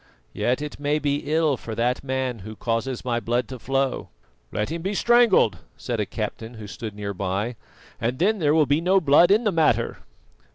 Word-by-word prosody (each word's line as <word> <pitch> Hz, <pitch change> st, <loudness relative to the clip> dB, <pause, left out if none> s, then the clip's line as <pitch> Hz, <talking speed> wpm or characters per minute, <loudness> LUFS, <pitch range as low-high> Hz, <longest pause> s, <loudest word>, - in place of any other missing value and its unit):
Yet 125 Hz, +4 st, 0 dB
it 150 Hz, -, -7 dB
may 145 Hz, +1 st, +1 dB
be 145 Hz, 0 st, -2 dB
ill 155 Hz, -4 st, +2 dB
for 110 Hz, -2 st, -7 dB
that 120 Hz, +2 st, 0 dB
man 130 Hz, -3 st, -2 dB
who 110 Hz, +3 st, -9 dB
causes 115 Hz, +3 st, -2 dB
my 120 Hz, -2 st, 0 dB
blood 120 Hz, 0 st, -1 dB
to 130 Hz, -2 st, -7 dB
flow." 135 Hz, +1 st, -1 dB, 0.4 s
"Let 105 Hz, -, -2 dB
him 165 Hz, 0 st, -3 dB
be 195 Hz, +4 st, -2 dB
strangled," 230 Hz, -, +4 dB, 0.2 s
said -, -, -3 dB
a -, -, -1 dB
captain 115 Hz, +1 st, -5 dB
who 110 Hz, -1 st, -9 dB
stood 105 Hz, +1 st, -7 dB
near 100 Hz, -1 st, -4 dB
by, 100 Hz, +5 st, -2 dB, 0.4 s
"and 120 Hz, +3 st, -1 dB
then 205 Hz, +6 st, +2 dB
there 150 Hz, -2 st, +3 dB
will 155 Hz, -2 st, +5 dB
be 145 Hz, +3 st, +1 dB
no 185 Hz, +3 st, +4 dB
blood 165 Hz, +1 st, +5 dB
in 210 Hz, +4 st, +4 dB
the 210 Hz, -, +2 dB
matter." 150 Hz, -, +1 dB
130 Hz, 200 wpm, -24 LUFS, 115-160 Hz, 0.4 s, will